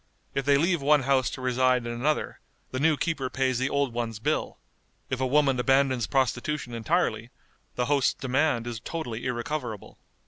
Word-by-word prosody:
If 135 - -1
they 140 0 +5
leave 170 +1 +1
one 145 0 +4
house 130 -1 +2
to - - -7
reside 125 -1 +2
in 120 - -3
another, 140 +6 -1 0.3
the 130 - -3
new 155 +1 +3
keeper 145 -6 -1
pays 130 -1 0
the 130 +1 0
old 140 -3 0
one's 115 -2 -3
bill; 110 - -1 0.5
if 130 0 -1
a 130 - +2
woman 135 -1 +3
abandons 135 -2 +2
prostitution 130 0 -1
entirely, 115 -2 0 0.5
the 125 - 0
host's 140 -1 +2
demand 130 -2 0
is 120 -2 -5
totally 125 -4 -5
irrecoverable. 120 -3 -4
130 Hz, 170 wpm, -27 LUFS, 120-140 Hz, 0.5 s, they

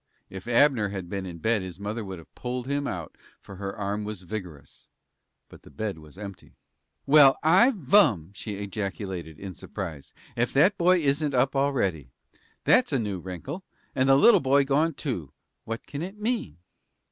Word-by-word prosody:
If 95 +2 -8
Abner 120 -3 +4
had 95 -3 -6
been 100 -2 -3
in 85 -2 -7
bed 110 +5 +1
his 90 -1 -8
mother 105 +3 -4
would 95 -2 -7
have 80 - -15
pulled 125 0 -4
him 140 +1 -1
out, 85 -4 -5 0.2
for 100 - -12
her 100 0 -5
arm 105 +1 -2
was 105 -3 -6
vigorous, 90 -7 -8 0.6
but - - -15
the - - -16
bed 105 -6 -4
was 75 +2 -15
empty. 100 -2 -10 0.5
"Well, 140 -2 +7
I 185 +11 +6
vum!" 145 - +3
she 105 +1 -6
ejaculated, 95 -5 -5
in 95 -2 -7
surprise. 85 -7 -7 0.2
"Ef 120 +1 0
that 170 +9 +4
boy 180 0 +4
isn't 145 0 +1
up 135 +2 +2
already. 100 - 0 0.5
That's - - +4
a - - +2
new 105 -6 -2
wrinkle. 95 - -7 0.3
And 130 +1 +2
the 135 - +7
little 200 +9 +7
boy 140 -1 +3
gone, 150 +3 +1
too. 95 - -4 0.3
What 115 +1 -5
can 145 - -6
it 190 +4 -6
mean?" 225 - -2
110 Hz, 175 wpm, -26 LUFS, 95-140 Hz, 0.6 s, Well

